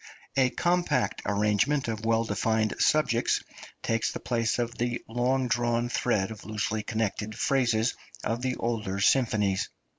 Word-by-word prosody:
A 130 Hz, -2 st, +4 dB
compact 175 Hz, -, 0 dB
arrangement 105 Hz, +8 st, +2 dB
of 110 Hz, -1 st, -3 dB
well 115 Hz, 0 st, +3 dB
defined 110 Hz, +1 st, 0 dB
subjects 130 Hz, -6 st, +2 dB, 0.4 s
takes 115 Hz, 0 st, 0 dB
the -, -, -5 dB
place 115 Hz, -2 st, 0 dB
of 120 Hz, -1 st, -2 dB
the 120 Hz, 0 st, -1 dB
long 125 Hz, +3 st, +1 dB
drawn 120 Hz, 0 st, +1 dB
thread 110 Hz, -5 st, 0 dB
of 110 Hz, -, -9 dB
loosely 110 Hz, 0 st, -2 dB
connected 110 Hz, -1 st, -2 dB
phrases 120 Hz, -4 st, +2 dB, 0.3 s
of 115 Hz, +2 st, -1 dB
the 130 Hz, 0 st, -1 dB
older 110 Hz, -5 st, -2 dB
symphonies. 105 Hz, -3 st, +2 dB
115 Hz, 140 wpm, -28 LUFS, 105-125 Hz, 0.4 s, A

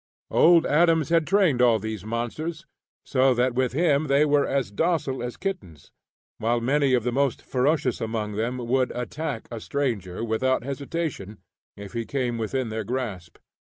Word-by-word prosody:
Old 170 Hz, 0 st, +5 dB
Adams 165 Hz, 0 st, +3 dB
had 165 Hz, -2 st, +2 dB
trained 185 Hz, -10 st, +3 dB
all 120 Hz, -2 st, +5 dB
these 110 Hz, -2 st, -5 dB
monsters 135 Hz, +9 st, -4 dB, 0.4 s
so 130 Hz, -1 st, +3 dB
that 125 Hz, +1 st, +1 dB
with 125 Hz, -1 st, 0 dB
him 155 Hz, -1 st, +2 dB
they 140 Hz, +2 st, +4 dB
were 145 Hz, -1 st, +2 dB
as 135 Hz, -7 st, -1 dB
docile 145 Hz, -, 0 dB
as 120 Hz, 0 st, -5 dB
kittens, 175 Hz, -, -6 dB, 0.5 s
while 120 Hz, +2 st, +1 dB
many 135 Hz, +2 st, +2 dB
of 120 Hz, -, 0 dB
the 125 Hz, -, 0 dB
most 135 Hz, 0 st, 0 dB
ferocious 130 Hz, -1 st, 0 dB
among 110 Hz, -2 st, -2 dB
them 115 Hz, +5 st, -2 dB
would 125 Hz, +1 st, 0 dB
attack 125 Hz, 0 st, -4 dB
a 115 Hz, -, -5 dB
stranger 115 Hz, -9 st, -3 dB
without 115 Hz, +3 st, 0 dB
hesitation, 140 Hz, -, -4 dB, 0.4 s
if 100 Hz, -1 st, -9 dB
he 115 Hz, -1 st, -2 dB
came 120 Hz, -2 st, -2 dB
within 120 Hz, +2 st, -2 dB
their 110 Hz, 0 st, -3 dB
grasp. 105 Hz, -7 st, -5 dB
125 Hz, 160 wpm, -25 LUFS, 115-145 Hz, 0.5 s, Old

